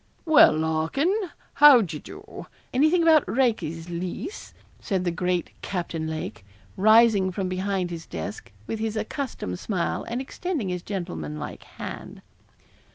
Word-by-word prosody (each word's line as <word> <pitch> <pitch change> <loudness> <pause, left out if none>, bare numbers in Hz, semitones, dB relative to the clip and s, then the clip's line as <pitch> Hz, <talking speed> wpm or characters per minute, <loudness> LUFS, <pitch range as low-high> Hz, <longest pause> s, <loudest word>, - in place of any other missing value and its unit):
'Well, 315 -2 +7
Larkin, 160 - +1 0.4
how 290 -4 +8
d'ye 160 -7 -4
do? - - -11 0.3
Anything 310 +6 +4
about 320 -3 +6
Raikes's 215 - 0
lease?' 185 - -5 0.3
said 190 -4 -1
the 175 - 0
great 180 0 -1
Captain 170 -4 -3
Lake, 155 -10 -5 0.3
rising 215 -2 +5
from 190 0 -2
behind 185 -1 -2
his 165 -1 -7
desk, 80 +3 -6
with 220 - -4
his 220 0 -2
accustomed 215 - -4
smile, 185 -5 -2
and 235 +2 -2
extending 270 - -3
his 180 -1 -3
gentlemanlike 80 - -5
hand. - - -9
190 Hz, 130 wpm, -25 LUFS, 170-245 Hz, 0.4 s, how